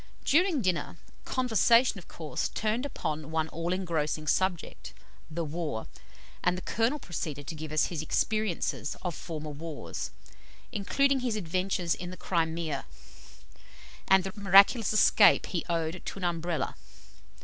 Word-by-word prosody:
During 325 - +3
dinner, 180 -2 -1 0.3
conversation, 240 -2 +3
of 175 - -15
course, 155 -3 -3
turned 220 +5 -1
upon 155 - -4
one 160 0 0
all 165 +3 -3
engrossing 160 -4 -1
subject, 180 +2 -1 0.3
the 165 +1 -3
war, 150 -7 -3 0.6
and 180 +1 +2
the 185 - -7
Colonel 230 +6 +1
proceeded 155 - -5
to 160 - -5
give 155 -1 -7
us 155 - +3
his 165 -4 -3
experiences 215 -2 -1
of 180 -2 -2
former 155 -2 -6
wars, 155 +1 -6 0.6
including 275 +5 +2
his 245 -3 -1
adventures 185 -2 0
in 175 - -6
the 185 - -8
Crimea, 160 -4 -1 1.2
and 190 -1 +5
the 190 0 -5
miraculous 200 +3 +6
escape 215 -1 +6
he 170 - -2
owed 165 +1 -1
to - - -6
an 195 - -7
Umbrella. 170 -1 -1
175 Hz, 140 wpm, -29 LUFS, 160-210 Hz, 1.2 s, miraculous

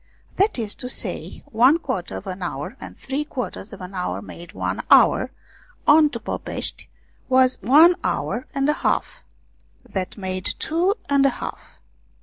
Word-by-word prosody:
That 405 -2 +2
is 220 -4 -1
to 250 - -4
say, - - -5
one 255 +7 +5
quarter 255 - -4
of - - -9
an 190 0 -6
hour 175 - -4
and - - -9
three 275 +3 -3
quarters 250 -8 -5
of 200 - -10
an 180 +1 -8
hour 180 -1 -2
made 170 0 -10
one - - -2
hour, - - +6 0.6
on 300 0 +6
to 235 - -5
Popeshti - - -5 0.4
was 255 -2 +4
one 305 - +7
hour 240 +3 -2
and 275 0 +1
a 300 - +4
half, - - 0 0.7
that 190 +1 -4
made 185 -2 -3
two 350 +5 +1
and 280 -1 +3
a 275 - +5
half. - - -8
250 Hz, 160 wpm, -23 LUFS, 190-295 Hz, 0.7 s, one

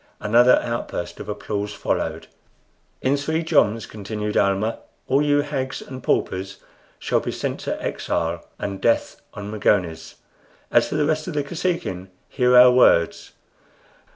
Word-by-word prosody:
Another 120 +4 +5
outburst 115 0 -4
of - - -8
applause 105 0 -4
followed. - - -2 0.8
"In 135 +2 +3
three 160 +3 -1
joms," 115 -9 +2
continued 105 0 -5
Almah, 100 +3 +1 0.3
"all 135 +2 +3
you 145 0 +3
hags 135 -3 -3
and 130 -1 -9
paupers 95 -3 -1 0.4
shall - - 0
be - - -4
sent - - -3
to - - -4
exile 85 +1 -2
and 100 -1 -5
death 115 - +1
on 100 0 -6
Magones. 85 -7 0 0.6
As - - +4
for - - -3
the 150 -1 +2
rest 155 +1 -1
of 175 - -5
the 145 - 0
Kosekin, 150 - -3 0.2
hear 125 -1 +3
our 125 0 +9
words. 125 -9 +3
115 Hz, 145 wpm, -22 LUFS, 100-145 Hz, 0.8 s, our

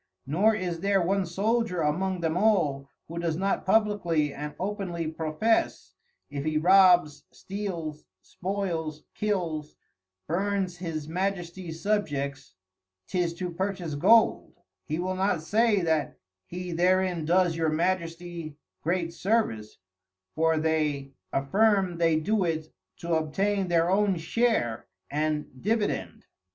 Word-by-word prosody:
Nor 195 +10 +3
is 180 -5 -3
there 200 +2 +2
one 190 +1 +1
Soldier 205 +1 0
among 180 +4 0
them 165 -1 0
all, 170 -9 +2 0.2
who 170 +1 -5
does 165 -2 -1
not 195 +1 -1
publickly 190 -8 +2
and 150 +1 -6
openly 185 -4 -3
profess, 160 +8 0 0.4
if 140 -1 -3
he 155 0 0
robs, 180 -3 +5
steals, 175 -7 -5 0.2
spoils, 175 -5 -4
kills, 170 -8 -2 0.5
burns 190 +1 -1
His 160 -4 -4
Majesties 175 -1 -3
Subjects, 145 - -2 0.5
'tis 175 - 0
to 180 0 -4
purchase 185 -2 -3
Gold: 225 +11 +4 0.3
He 155 -1 -2
will 185 +2 -1
not 185 -3 0
say 215 +2 +3
that 160 -3 0 0.3
he 180 0 -6
therein 180 0 +2
does 175 +1 +3
your 165 -1 +1
Majesty 170 -1 -2 0.2
great 170 0 -1
Service, 175 - -1 0.6
for 160 0 +2
they 155 -3 0 0.2
affirm 190 +4 +2
they 165 -2 +3
do 210 +5 +1
it 160 -2 -2 0.2
to 170 0 -3
obtain 190 +5 0
their 170 -1 +3
own 200 -1 +2
Share 165 - 0 0.2
and 150 -3 -2
Dividend. 215 +1 -1
175 Hz, 120 wpm, -27 LUFS, 155-195 Hz, 0.6 s, robs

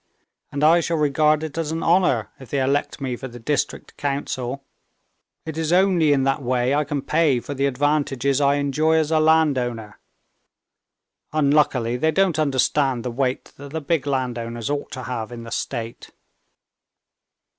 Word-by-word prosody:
And 145 +1 -3
I 165 +3 +6
shall 170 0 -1
regard 150 +1 +2
it 160 +1 -5
as 160 -2 -2
an 165 +1 -3
honor 165 - +2
if 130 - -12
they 140 - -1
elect 140 +2 -1
me 130 -2 -2
for 130 - -7
the 120 -1 -11
district 145 +4 -3
council. 140 -2 -3 0.8
It's 160 0 -3
only 180 -4 +4
in 135 -2 +3
that 135 +1 0
way 125 0 0
I 150 +1 +2
can 145 -1 -3
pay 155 -5 +2
for 145 - -6
the 140 0 0
advantages 140 -1 0
I 140 0 +3
enjoy 145 +3 +1
as 160 -1 +1
a 160 - +3
landowner. 130 -9 +1 1.3
Unluckily 140 -5 +2
they 160 +5 +1
don't 170 -1 +2
understand 135 -3 +1
the 125 - -2
weight 130 +1 -2
that 140 +1 -10
the 160 - -1
big 145 -1 -1
landowners 120 -2 -2
ought 145 -1 -3
to 130 - -6
have 115 -2 -4
in 120 -1 -8
the 115 - -10
state." 115 0 -5
140 Hz, 165 wpm, -22 LUFS, 125-155 Hz, 1.3 s, I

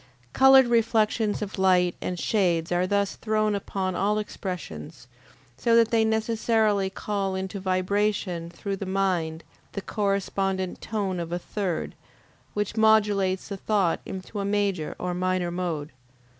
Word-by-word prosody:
Colored 265 0 +7
reflections 225 -2 +1
of 205 -1 -6
light 180 -2 +4
and 180 - -3
shade 175 -4 +1
are 180 +1 +1
thus 200 0 0
thrown 215 -1 +1
upon 190 -1 -2
all 205 +3 +1
expressions, 175 - -6 0.5
so 230 -1 +2
that 230 -1 +4
they 225 -1 +4
necessarily 220 -2 +1
call 195 -1 -2
into 190 +1 -4
vibration 185 -2 0
through 195 +3 -4
the 195 - -5
mind 180 -4 0 0.3
the 200 - -3
correspondent 195 -2 -1
tone 200 -4 -2
of 170 -1 -5
a 175 - 0
third, 180 -1 -3 0.6
which 210 0 -2
modulates 205 -4 +3
the 200 - -4
thought 195 -4 +1
into 190 +3 -6
a - - -1
major 200 -5 -1
or 180 0 -3
minor 185 -1 0
mode. 165 -4 -3
195 Hz, 140 wpm, -26 LUFS, 180-210 Hz, 0.6 s, Colored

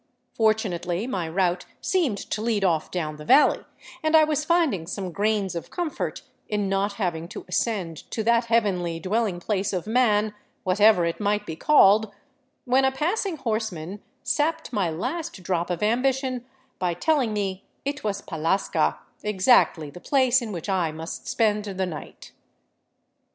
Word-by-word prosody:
Fortunately 200 -4 0
my 185 -10 -3
route 180 +1 0
seemed 320 - +1
to 210 - -4
lead 220 -3 0
off 165 -4 +1
down 155 -4 -3
the 150 - -9
valley, 270 - +5 0.4
and 315 0 +2
I 310 - +7
was 305 -1 0
finding 305 - +1
some 185 0 -4
grains 205 0 0
of 170 - -6
comfort 345 -4 -3 0.3
in 210 -2 0
not 195 +1 0
having 175 -5 -2
to - - -9
ascend 180 -4 -2
to 220 - -2
that 235 +1 +3
heavenly 190 -8 +1
dwelling 200 +1 -1
place 200 +1 -1
of 180 -3 -2
man, 215 -2 +2 0.3
whatever 195 -1 +4
it 170 - -2
might 210 0 0
be 160 - -5
called, 215 - +5 0.5
when 260 +1 +3
a 265 - +3
passing 340 +6 -1
horseman 215 - -3 0.2
sapped 320 -1 -1
my 200 -6 +1
last 250 - -4
drop 175 -1 -1
of 175 +2 -2
ambition 255 +2 0 0.3
by 180 -2 0
telling 270 - +1
me 195 -2 -3 0.2
it 285 +1 -3
was 205 -2 -2
Pallasca 160 - 0
— - - -41
exactly 190 - +3
the 180 - -11
place 260 -2 +3
in 225 -3 -5
which 175 -2 -5
I 185 -5 +1
must 160 +2 -7
spend 210 -2 +1
the 190 -2 -2
night! 160 -4 -9
205 Hz, 160 wpm, -25 LUFS, 180-245 Hz, 0.5 s, I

